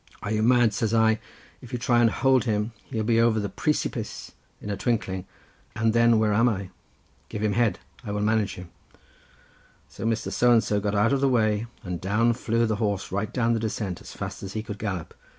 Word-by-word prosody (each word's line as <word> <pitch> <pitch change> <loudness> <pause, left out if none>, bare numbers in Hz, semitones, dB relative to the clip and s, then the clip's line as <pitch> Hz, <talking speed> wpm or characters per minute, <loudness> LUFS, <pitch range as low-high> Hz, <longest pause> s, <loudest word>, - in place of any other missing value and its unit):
"'Are 105 - -3
you 110 0 +1
mad?' 120 -1 +4
says 110 +1 0
I, 110 -1 +4 0.4
'if 125 - -12
you 125 - -2
try 120 0 +3
to 115 - +5
hold 130 0 +3
him 105 0 0
he'll 110 -4 -3
be 115 +1 +3
over 115 -1 +3
the 100 -1 -2
pree 155 - 0
si - - 0
pice - - -6 0.3
in 105 - -5
a - - -1
twinkling, 95 -5 -2 0.5
and 110 0 +1
then 115 -1 +5
where 110 -1 +2
am 115 +4 +4
I? 95 -4 -4 0.6
Give 105 - -4
him 105 -1 +1
head; 105 -3 +2 0.3
I - - -11
can 105 0 -1
manage 110 -1 +1
him.' 90 -1 -10 1.2
"So - - -9
Mr. 115 0 -1
So 125 0 +3
and 115 -2 +5
so 105 - 0
got 100 0 -1
out 110 +6 +3
of 135 - +1
the 140 - +3
way, 110 -2 +1 0.2
and 90 -3 -5
down 110 +5 +2
flew 115 0 0
the 110 -2 -1
horse 100 -3 -2
right 100 +3 -2
down 115 -2 +1
the 115 - 0
descent, 105 -4 -3
as - - -11
fast - - -6
as 95 0 -7
he 110 - -3
could 105 -2 -7
gallop. 95 -6 -4
110 Hz, 225 wpm, -25 LUFS, 105-115 Hz, 1.2 s, to